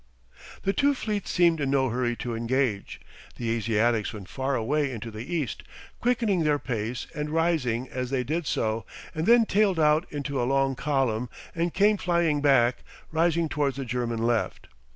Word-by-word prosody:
The 195 - +1
two 285 +3 +3
fleets 210 -5 -3
seemed 170 -3 +3
in 140 - 0
no 135 -1 +2
hurry 120 0 0
to 120 0 -4
engage. 115 -2 -1 0.4
The 115 -2 -2
Asiatics 115 0 +1
went 100 -4 -9
far 135 +1 -1
away 140 +5 0
into 115 -2 -6
the 110 +8 -8
east, 155 -9 -2 0.4
quickening 230 -6 +1
their 150 -1 +3
pace 120 -3 -3
and 150 0 -3
rising 150 -7 0
as 125 -1 -4
they 130 -1 0
did 155 +4 -2
so, 110 0 0 0.3
and 160 +1 -2
then 235 0 +6
tailed 200 -4 +2
out 155 +2 +3
into 140 -2 -2
a 120 - 0
long 135 0 +2
column 130 -4 0 0.2
and 170 +1 -1
came 205 +3 +3
flying 170 -5 +1
back, 130 -4 +4 0.3
rising 165 +1 +2
towards 145 -3 -1
the 135 - -3
German 120 -1 -2
left. 120 -1 -1
135 Hz, 175 wpm, -26 LUFS, 120-165 Hz, 0.4 s, then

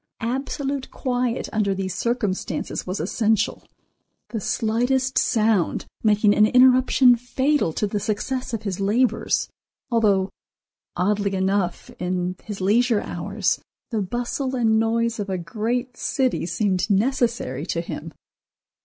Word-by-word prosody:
Absolute 270 +2 -2
quiet 250 -2 -1
under 205 -3 +1
these 190 -1 -3
circumstances 225 -7 -2
was 185 +2 -3
essential, 215 +5 0 0.7
the 225 - -3
slightest 245 +5 0
sound 215 -6 +1 0.2
making 210 -1 +4
an 215 +1 +5
interruption 255 0 +6
fatal 255 - 0
to 210 - 0
the 205 0 -2
success 250 +6 -2
of 225 -2 -3
his 195 -3 -3
labors, 225 +6 +1 0.4
although, 205 -4 +2 0.6
oddly 200 +2 0
enough, 190 -1 -1
in 180 0 -1
his 210 -2 -6
leisure 220 +3 +3
hours - - -2 0.3
the 220 -3 0
bustle 245 +6 -2
and 220 -3 +3
noise 230 0 0
of 205 -1 -3
a 190 - -1
great 230 +8 -2
city 255 -7 0
seemed 190 +1 0
necessary 230 - 0
to 170 0 -2
him. 165 -1 -6
220 Hz, 125 wpm, -23 LUFS, 195-245 Hz, 0.7 s, interruption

